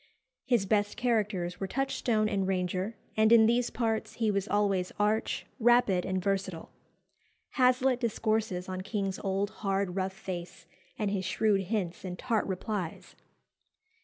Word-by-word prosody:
His 240 -6 +2
best 205 0 +1
characters 210 -7 0
were 195 - -2
Touchstone 240 -3 0
and 195 -3 0
Ranger, 185 +3 -1 0.2
and 220 +1 +4
in 230 -1 +8
these 235 +2 +2
parts 225 -2 -1
he 225 -2 +1
was 200 0 -1
always 200 -3 +1
arch, 210 +1 0
rapid, 235 -6 +4
and 190 0 0
versatile. 190 -3 -2 0.8
Hazlitt 255 0 +3
discourses 220 -5 -1
on 185 0 -4
King's 195 -1 -2
old, 195 +1 -1
hard, 195 -2 0
rough 190 0 -1
face, 185 -3 -7 0.3
and 210 -3 -1
his 190 -2 -1
shrewd 205 +1 +2
hints 185 -4 -2
and 180 -1 -5
tart 230 0 0
replies. 190 -2 -4
205 Hz, 140 wpm, -30 LUFS, 190-225 Hz, 0.8 s, in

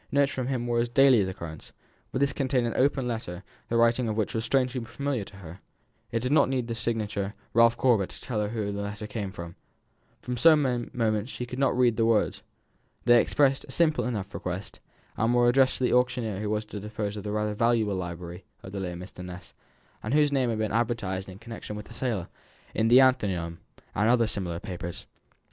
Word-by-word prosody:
Notes 140 0 +3
from 130 -2 -3
him 130 -3 -1
were 120 -1 +1
of 120 0 -2
daily 135 -4 +7
occurrence, 85 -4 -6 0.4
but 130 - -2
this 140 -1 +2
contained 130 -3 0
an 115 - -1
open 135 -1 +2
letter 100 -6 -4 0.3
the 115 - +1
writing 115 0 +3
of 110 - -2
which 110 - 0
was 110 - -1
strangely 125 -1 +1
familiar 125 0 -3
to 100 - -14
her 90 -1 -10 0.5
it 115 - 0
did 125 +2 -1
not 150 - +5
need 130 -2 0
the 115 - -3
signature 110 -3 -2 0.2
"Ralph 115 0 +5
Corbet," 115 -7 +3
to - - -10
tell 115 -5 -3
her 105 - -1
whom 105 -3 -3
the 100 - -3
letter 105 +1 -5
came 105 -3 -4
from. 85 -2 -8 0.6
For 125 - -4
some 130 -4 +4
moments 110 -1 0
she 125 - -5
could 125 +2 -7
not 135 -2 +2
read 120 -3 +3
the 115 - +3
words. 115 -2 +2 0.6
They 120 0 +7
expressed 135 -2 +2
a - - -11
simple 160 -2 +3
enough 105 -6 -3
request, 90 +2 -5 0.4
and 115 +2 +2
were 120 0 +4
addressed 130 +2 +4
to - - -3
the 125 - +2
auctioneer 120 -5 +1
who 105 0 -2
was 105 0 -1
to 105 -1 -7
dispose 105 0 -4
of 105 - -6
the 105 - -3
rather 105 0 -1
valuable 115 -1 +2
library 90 0 -6 0.2
of 95 - -8
the 100 - -4
late 90 -2 -4
Mr. 90 +1 -9
Ness, 90 -1 -9 0.5
and 110 +6 -1
whose 150 -1 +4
name 130 -3 +2
had 115 - -1
been 110 -1 -1
advertised 105 -5 -1
in 95 - -10
connection 115 -1 -8
with 105 0 -7
the - - -13
sale, 115 -7 -2 0.5
in 110 - +1
the 120 +3 +7
Athenaeum, 95 -10 +1 0.3
and 105 +3 +2
other 120 -1 +4
similar 90 -6 -3
papers. 85 -3 -6
115 Hz, 215 wpm, -27 LUFS, 100-125 Hz, 0.6 s, daily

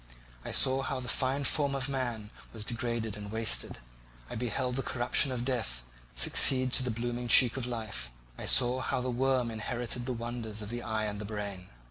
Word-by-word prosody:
I - - -6
saw 135 0 +3
how 135 -1 -3
the 125 - -7
fine 135 +3 0
form 140 0 +1
of 135 0 -2
man 120 -6 -3 0.2
was 110 -2 -3
degraded 115 -2 -2
and 105 -1 -8
wasted; 110 -1 0 0.5
I - - -4
beheld 125 +2 -2
the - - 0
corruption 130 +2 +2
of 125 -1 -3
death 110 - -2 0.3
succeed 130 - +5
to - - +4
the 125 - -2
blooming 120 +1 -3
cheek 120 0 +7
of 130 -2 -1
life; 110 - -4 0.3
I - - -7
saw 125 +1 +5
how 130 - -1
the 125 0 -2
worm 125 -1 +1
inherited 120 +2 -3
the 130 - -1
wonders 115 -2 -5
of 105 - -7
the 120 +1 -4
eye 110 -2 -2
and 105 -1 -4
brain. 100 -3 -6
120 Hz, 190 wpm, -30 LUFS, 110-130 Hz, 0.5 s, cheek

